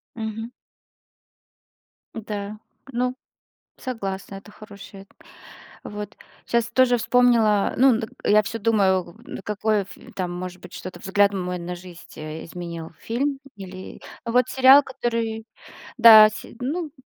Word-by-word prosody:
Мгм. 225 0 -5 1.6
Да, 210 -1 -6 0.3
ну, 250 +1 -1 0.6
согласна, 195 -5 -5
это 205 +2 -13
хорошая, 200 -2 -12 0.8
вот. 210 +1 -7 0.3
Сейчас 235 -1 0
тоже 255 -1 +4
вспомнила, 230 -4 +3
ну 255 -2 +5
д 225 -2 -4 0.2
я 210 +1 +5
всё 220 +3 -5
думаю, 195 -5 +1 0.3
какой 210 0 0 0.3
там 180 -2 -3
может 180 0 -6
быть 180 - -13
что-то 185 -1 -8
взгляд 200 +2 +2
мой 180 -2 -3
на 175 +1 -5
жизнь 175 -1 -13
изменил, 165 +2 -7
фильм, 270 +4 -2 0.2
или 190 -1 -9 0.2
вот 245 +1 +2
сериал, 265 +2 +7
который, 230 -4 -3 0.5
да 220 -2 +10
се 215 +2 -10
ну, 310 +4 -3
215 Hz, 115 wpm, -23 LUFS, 190-235 Hz, 1.6 s, да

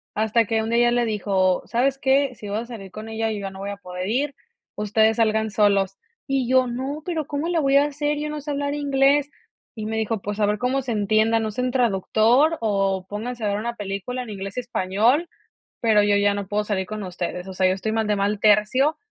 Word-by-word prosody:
hasta 220 +2 +2
que 225 +1 0
un 220 - -3
día 240 +1 +3
ya - - 0
le 240 0 +2
dijo: 195 -4 +1
"¿Sabes 260 +3 +1
qué?, 270 -1 +2
si 210 -2 -9
vas 210 +3 -2
a - - -10
salir 195 -3 -10
con 215 +1 -8
ella, 225 0 -1
yo 210 - -3
ya 195 -1 -4
no 190 0 -11
voy 200 +1 -4
a 200 - -7
poder 180 -1 -6
ir, 270 +6 -1 0.4
ustedes 220 +2 +2
salgan 220 -1 +2
solos", 200 -2 +2 0.3
y 270 -3 0
yo: 255 0 +4
"No, 265 +5 -4
pero, 325 -3 -2
¿cómo 290 +2 -3
le 345 -1 +1
voy 275 -2 +3
a 285 - +5
hacer?, 295 0 -2
yo 300 0 -3
no 300 0 -5
sé 295 +1 -5
hablar 285 0 -2
inglés", 285 0 +2 0.4
y 215 -2 -5
me 220 0 -2
dijo: 220 -1 -1
"Pues, 205 +1 -5
a 210 - +3
ver 210 +1 0
cómo 260 +2 0
se 250 - -4
entiendan, 220 +1 +2
usen 250 +4 -2
traductor 240 - +3
o 195 -3 0
pónganse 230 +3 -5
a - - +1
ver 200 0 0
una 235 +3 -3
película 205 +4 -4
en 245 - -8
inglés 195 0 -6
y - - +2
español, 240 - +1 0.5
pero 220 -3 +4
yo 205 0 +3
ya 205 0 +3
no 200 -1 -4
puedo 210 +2 0
salir 200 -3 -2
con 215 +2 -5
ustedes, 180 0 -5
o 190 - -7
sea, 185 0 +2
yo 185 - +3
estoy 205 +3 -3
mal 220 -1 0
de 210 - +2
mal 200 +1 0
tercio", 215 +9 +3
220 Hz, 240 wpm, -23 LUFS, 205-260 Hz, 0.5 s, a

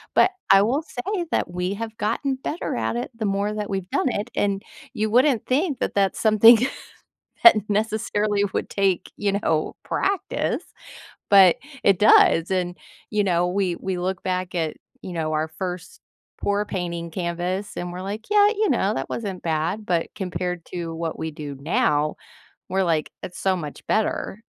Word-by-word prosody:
But - - +5 0.2
I 195 0 +8
will 260 +8 +1
say 345 +6 -3
that - - 0
we 180 +2 -2
have 225 +1 -6
gotten 270 +6 -1
better 285 +5 -4
at 115 -1 -1
it 120 - -3
the 220 - -3
more 200 +2 0
that 210 -1 -4
we've 190 -2 -3
done 270 -1 +1
it, 220 +1 -3
and 200 -1 0 0.3
you 215 0 -1
wouldn't 255 -1 +3
think 285 +2 +1
that - - -1
that's 195 -1 +1
something 225 +2 +7 0.9
that 350 - +11
necessarily 210 -1 0
would - - -2
take, 195 -3 0
you 200 -1 0
know, 155 -1 0
practice, 395 -1 -1 0.7
but 190 -3 +8 0.3
it 195 -3 +4
does. 185 -5 +6
And, 180 -1 -1 0.3
you 210 -1 +2
know, 175 -1 +2
we 185 -1 0
we 190 -1 -3
look 185 +1 -2
back 185 -1 -2
at, 160 -2 -1 0.3
you 185 - -7
know, 160 -2 -2
our 155 +1 0
1st 180 +2 -6 0.4
pour 205 +1 0
painting 170 -3 -4
canvas, 180 +3 -3
and 175 0 -4
we're 180 +1 -6
like, 205 +3 -6
"Yeah, 415 -1 +6
you 430 -1 0
know, 210 -6 +2
that 135 - -3
wasn't 200 -5 -4
bad." 170 +6 -1
But 170 -2 0
compared 180 -3 -4
to 170 -2 -5
what 165 0 -4
we 160 0 -3
do 145 -2 -7
now, 150 0 +1 0.5
we're 190 +1 +1
like, 160 -3 0
"It's 180 - -7
so 190 -1 +2
much 150 -4 -8
better." 215 -1 -1
190 Hz, 175 wpm, -23 LUFS, 175-215 Hz, 0.9 s, that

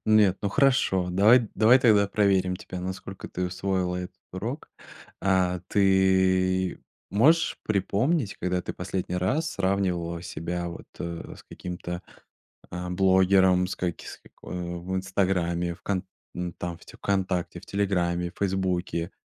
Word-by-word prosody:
Нет, 105 -3 +5
ну, 100 - +1
хорошо, 100 -6 +2
давай 110 +5 +5
давай 120 +4 +6
тогда 105 -5 +4
проверим 95 -3 +2
тебя, 90 - -7
насколько 95 +1 -6
ты 90 - -3
усвоила 90 0 -1
этот 90 0 -6 0.2
урок. 115 - -5 0.5
А, 90 -2 +2
ты 95 -2 +3 0.3
можешь 155 +11 +3
припомнить, 110 - 0
когда 90 0 -1
ты - - -5
последний 90 0 -3
раз 145 - 0
сравнивала 90 -3 -1
себя 85 0 -4
вот, 85 - -9
э, 85 -1 -6
с - - -14
каким-то, 90 0 -6 0.7
а, 90 0 -4
блогером, 95 0 +4
с - - -4
каки 90 -2 -3
с - - -8
како - - -14
э, 85 -1 -4
в 95 +2 -4
"Инстаграме", 90 -2 0
в - - -26
кон 95 -2 -1 0.3
м, 90 -1 -4
там 85 -1 -5
те - - -14
"Вконтакте", 95 -3 -1
в - - -15
"Телеграме", 90 -3 0
"Фейсбуке", 90 -3 -1
95 Hz, 140 wpm, -26 LUFS, 90-100 Hz, 0.7 s, давай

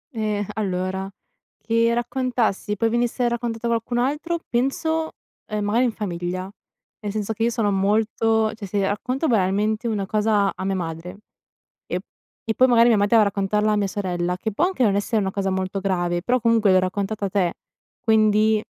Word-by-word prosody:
Eh, 210 -2 -1
allora, 190 -1 -2 0.5
che 230 +1 +1
raccontassi 240 -4 -1
poi 225 +3 +1
venisse 240 +1 0
raccontato 235 -1 -3
a - - +1
qualcun 235 +1 -1
altro 300 +7 -1
penso, 315 +6 -1 0.4
ehm, 210 -1 -2
magari 235 +5 +2
in 240 - +1
famiglia, 180 -3 -4 0.6
nel 205 -2 -4
senso 215 +1 -2
che 220 - -10
io 235 - +3
sono 225 -4 0
molto 220 +2 +1
cioè 210 -3 -8
se 195 0 0
racconto 255 +8 -2
banalmente 215 +2 +1
una 205 -3 -1
cosa 210 -1 +2
a 190 - -5
mia 195 - 0
madre, 175 +1 -5 0.7
e - - -2
p - - -39 0.4
e 225 - 0
poi 255 +4 +5
magari 235 -1 +5
mia 225 - +4
madre 205 +3 +3
va 220 - +7
a - - +2
raccontarla 205 +2 +1
a 210 - +2
mia 200 -1 +1
sorella, 180 -2 -2
che 220 +3 -3
può 305 - +1
anche 365 -9 0
non 205 -3 +3
essere 210 +2 0
una 190 -1 -1
cosa 195 -1 -1
molto 190 +1 -2
grave, 175 -2 0
però 250 +6 +1
comunque 225 -3 +3
l'ho 185 - +6
raccontata 200 +2 -2
te, 185 -3 +1 0.5
quindi 215 -1 +3
210 Hz, 185 wpm, -23 LUFS, 195-230 Hz, 0.7 s, va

